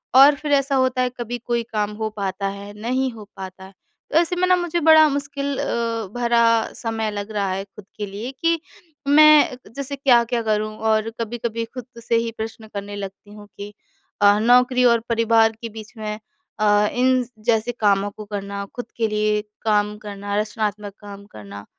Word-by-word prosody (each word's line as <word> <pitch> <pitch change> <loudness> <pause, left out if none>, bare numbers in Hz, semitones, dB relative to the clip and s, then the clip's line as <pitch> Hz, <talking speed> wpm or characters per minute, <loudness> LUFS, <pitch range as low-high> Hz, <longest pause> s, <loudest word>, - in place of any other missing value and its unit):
और 280 +2 +8
फिर 300 +1 -5
ऐसा 275 0 +2
होता 260 -1 +2
है 250 - +1
कभी 240 0 -3
कोई 240 -1 -2
काम 210 -1 0
हो 220 0 -3
पाता 195 0 -2
है, 200 +1 -7
नहीं 255 +3 0
हो 220 -3 -11
पाता 190 0 -8
है, 190 - -15 0.4
तो - - +3
ऐसे 345 +1 0
में 365 +1 +1
न 365 -1 +4
मुझे 345 -1 -1
बड़ा 315 -1 +7
मुश्किल 280 0 -3
अ, 230 -2 -2
भरा 235 -2 +2
समय 225 -2 -3
लग 205 +1 -5
रहा 200 -2 -1
है 195 +1 -2
खुद 200 0 -15
के 210 - -3
लिए 205 +6 -6
कि 335 -1 +2 0.5
मैं 300 -2 +6 0.2
जैसे 280 0 -4
क्या-क्या 240 -3 +3
करूँ? 215 0 -1
और 220 0 +1
कभी-कभी 230 0 -3
खुद 250 -2 -7 0.2
से 230 - 0
ही 230 0 0
प्रश्न 220 0 -6
करने 205 0 -5
लगती 200 +1 -8
हूँ 210 -1 -12
कि 205 +1 -8 0.5
अ, 205 0 +6
नौकरी 250 +2 +4
और 235 -1 +5
परिवार 230 -1 +4
के 230 - -5
बीच 220 0 -11
में 215 -1 -4 0.4
अ, 210 0 +4
इन 255 0 +2 0.2
जैसे 230 0 +2
कामों 200 -1 +2
को 215 +1 -10
करना, 200 -1 -5
खुद 245 - -5
के 225 -1 +1
लिए 210 0 0 0.2
काम 210 -1 +1
करना, 205 -1 -6
रचनात्मक 210 -1 -3
काम 200 -1 -10
करना, 100 -1 -10
225 Hz, 185 wpm, -22 LUFS, 205-250 Hz, 0.5 s, और